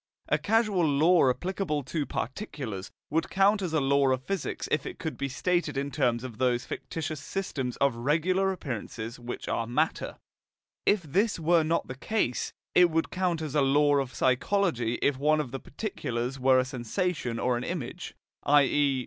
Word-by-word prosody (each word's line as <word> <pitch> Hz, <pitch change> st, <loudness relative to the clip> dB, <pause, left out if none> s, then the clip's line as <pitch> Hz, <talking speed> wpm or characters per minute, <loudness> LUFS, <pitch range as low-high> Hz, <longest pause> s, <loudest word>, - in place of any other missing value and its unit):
A -, -, +3 dB
causal 215 Hz, -4 st, +2 dB
law 155 Hz, 0 st, +4 dB
applicable 175 Hz, 0 st, -1 dB
to 145 Hz, +3 st, -3 dB
particulars 120 Hz, -, -5 dB, 0.2 s
would 160 Hz, +2 st, 0 dB
count 200 Hz, +2 st, +3 dB
as 180 Hz, -4 st, -2 dB
a 160 Hz, -, +2 dB
law 140 Hz, 0 st, +3 dB
of 130 Hz, 0 st, 0 dB
physics 190 Hz, +3 st, -3 dB
if 150 Hz, -3 st, +1 dB
it -, -, -7 dB
could 160 Hz, -3 st, -4 dB
be 140 Hz, -, -3 dB
stated 175 Hz, +3 st, 0 dB
in 140 Hz, +1 st, -2 dB
terms 125 Hz, -4 st, +1 dB
of 120 Hz, -4 st, -8 dB
those 125 Hz, -1 st, +1 dB
fictitious 155 Hz, -2 st, -5 dB
systems 140 Hz, -6 st, -3 dB
of 140 Hz, -2 st, +3 dB
regular 170 Hz, +9 st, +1 dB
appearances 120 Hz, -, -5 dB
which 120 Hz, 0 st, -6 dB
are 115 Hz, -, -1 dB
matter; 150 Hz, +7 st, -1 dB, 0.7 s
if 205 Hz, -3 st, +4 dB
this 195 Hz, +9 st, +1 dB
were 165 Hz, +1 st, +4 dB
not 165 Hz, +2 st, 0 dB
the -, -, -5 dB
case, 135 Hz, -, -1 dB, 0.2 s
it 180 Hz, -1 st, +6 dB
would 165 Hz, 0 st, 0 dB
count 180 Hz, -3 st, 0 dB
as 150 Hz, -3 st, -4 dB
a 150 Hz, -, +3 dB
law 145 Hz, +1 st, +4 dB
of 135 Hz, -2 st, -2 dB
psychology 130 Hz, -, +1 dB
if 140 Hz, -2 st, +2 dB
one 155 Hz, +2 st, +3 dB
of 130 Hz, -5 st, -3 dB
the 135 Hz, -, -4 dB
particulars 130 Hz, -, -4 dB
were 130 Hz, 0 st, +5 dB
a 130 Hz, -, +3 dB
sensation 130 Hz, -, -2 dB
or 125 Hz, +1 st, +1 dB
an 120 Hz, -, -3 dB
image, 165 Hz, -9 st, -5 dB, 0.3 s
i.e. 145 Hz, -1 st, +5 dB
145 Hz, 175 wpm, -28 LUFS, 130-175 Hz, 0.7 s, it